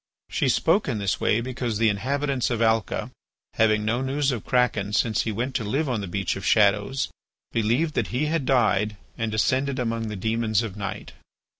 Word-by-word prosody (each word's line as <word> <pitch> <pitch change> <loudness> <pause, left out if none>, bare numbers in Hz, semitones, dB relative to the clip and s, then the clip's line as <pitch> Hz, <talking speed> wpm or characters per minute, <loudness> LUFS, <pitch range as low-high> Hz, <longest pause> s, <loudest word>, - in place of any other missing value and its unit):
She - - +1
spoke 205 - +2
in 125 -5 -1
this 100 -2 -1
way 110 - +2
because 120 -3 -3
the 115 +1 +3
inhabitants 135 +5 -1
of 120 -3 -1
Alca, 110 -2 +1 0.4
having 110 -1 +2
no 120 +3 0
news 135 +1 0
of 115 -5 -4
Kraken 115 -5 +1
since 110 0 +2
he 110 - -2
went 120 +5 -2
to 115 - -4
live 135 +9 -1
on 120 -5 -1
the 100 - -5
Beach 95 +1 -2
of 95 - -7
Shadows, 105 +6 +2 0.4
believed 120 +8 +1
that - - 0
he 130 +5 -1
had 155 -3 -1
died 105 -5 +2 0.2
and 115 -2 -2
descended 130 +5 +1
among 115 -2 -2
the 105 - -4
demons 110 +1 0
of 105 -4 -5
night. 100 -1 -5
115 Hz, 190 wpm, -25 LUFS, 105-130 Hz, 0.4 s, the